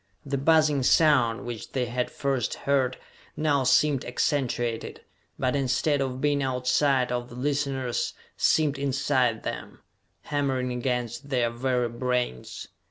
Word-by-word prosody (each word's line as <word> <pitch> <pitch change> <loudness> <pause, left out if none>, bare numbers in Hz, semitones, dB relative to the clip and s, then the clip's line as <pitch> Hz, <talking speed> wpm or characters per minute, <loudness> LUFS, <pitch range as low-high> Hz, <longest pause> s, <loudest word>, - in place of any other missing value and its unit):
The 140 -1 -2
buzzing 155 -1 +3
sound 130 -5 +3
which 120 -2 -7
they 130 -2 0
had 125 +1 -2
first 135 -5 -1
heard 130 -2 0 0.4
now 145 -3 +2
seemed 135 +2 +3
accentuated, 120 -3 -1 0.4
but, 130 +1 0
instead 140 +2 +1
of 130 -1 -2
being 145 0 +1
outside 130 0 +1
of 120 0 -3
the 120 - -11
listeners, 135 -2 -1 0.2
seemed 145 -3 +2
inside 130 -4 +1
them, - - -6 0.4
hammering 135 -3 -1
against 125 +1 -3
their 120 -3 +1
very 125 0 0
brains! 125 - -3
130 Hz, 125 wpm, -26 LUFS, 125-140 Hz, 0.4 s, buzzing